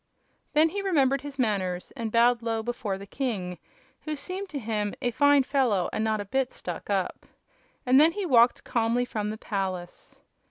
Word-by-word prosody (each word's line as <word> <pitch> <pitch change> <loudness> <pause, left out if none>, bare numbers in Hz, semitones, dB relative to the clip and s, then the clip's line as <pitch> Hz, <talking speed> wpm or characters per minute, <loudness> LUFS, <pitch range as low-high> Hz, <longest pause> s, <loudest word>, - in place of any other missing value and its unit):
Then 310 +2 +5
he 400 +4 -3
remembered 275 -8 +2
his 285 -1 -8
manners 190 -7 -1
and 225 -2 -4
bowed 235 +1 +4
low 225 -1 -2
before 220 -4 -3
the 200 - -9
king, 200 -7 -3 0.4
who 310 -1 -4
seemed 370 +6 -5
to 300 - -5
him 210 -4 -2
"a 245 - -1
fine 285 +3 +4
fellow 255 -9 +1
and 215 - -1
not 220 -1 0
a 205 - -4
bit 265 +5 -1
stuck 175 +1 -7
up." 195 -2 -2 0.6
And 260 +1 +6
then 325 +2 +5
he 410 0 -3
walked 245 -6 +4
calmly 235 +1 +1
from 210 -3 -3
the 215 - -4
palace. 190 -5 -5
235 Hz, 185 wpm, -27 LUFS, 205-275 Hz, 0.6 s, And